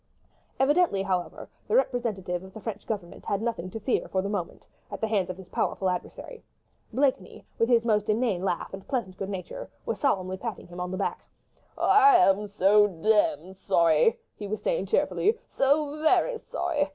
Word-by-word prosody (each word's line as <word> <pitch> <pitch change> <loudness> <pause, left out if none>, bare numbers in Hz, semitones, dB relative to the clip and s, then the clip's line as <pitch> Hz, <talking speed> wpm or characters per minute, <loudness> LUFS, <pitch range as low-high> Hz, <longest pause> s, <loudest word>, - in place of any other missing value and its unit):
Evidently, 280 - +3
however, 185 -2 -3 0.2
the - - +1
representative 215 - 0
of 190 0 -13
the - - -7
French 210 -1 -6
Government 200 -6 -5
had 200 - -1
nothing 220 -5 -3
to 225 - -6
fear 240 +4 -1
for 190 -1 -1
the 200 - -3
moment, 190 -5 -4 0.3
at - - -5
the - - 0
hands 200 -5 0
of 185 - -5
his 190 -2 -12
powerful 190 -1 0
adversary. 445 - -6 0.5
Blakeney, 255 -7 -1
with 230 - +2
his 235 -2 +4
most 210 -2 +1
inane 215 -4 +1
laugh 185 -2 -2
and 190 0 -9
pleasant 230 -9 -2
good 195 0 -5
nature, 205 - -6 0.2
was - - -3
solemnly 190 -9 0
patting 225 +1 -6
him 175 +1 -10
on 180 0 -3
the 185 - -4
back. 200 - -2 0.5
"I 415 0 +6
am 205 - +4
so 205 +1 +4
demmed 190 -2 +1
sorry.. 170 0 +3
." - - -49
he 205 - -5
was 215 +2 -4
saying - - 0
cheerfully, 445 -1 +1
"so 290 +2 +1
very 455 +9 +2
sorry 300 -9 -2
210 Hz, 185 wpm, -27 LUFS, 185-265 Hz, 0.5 s, I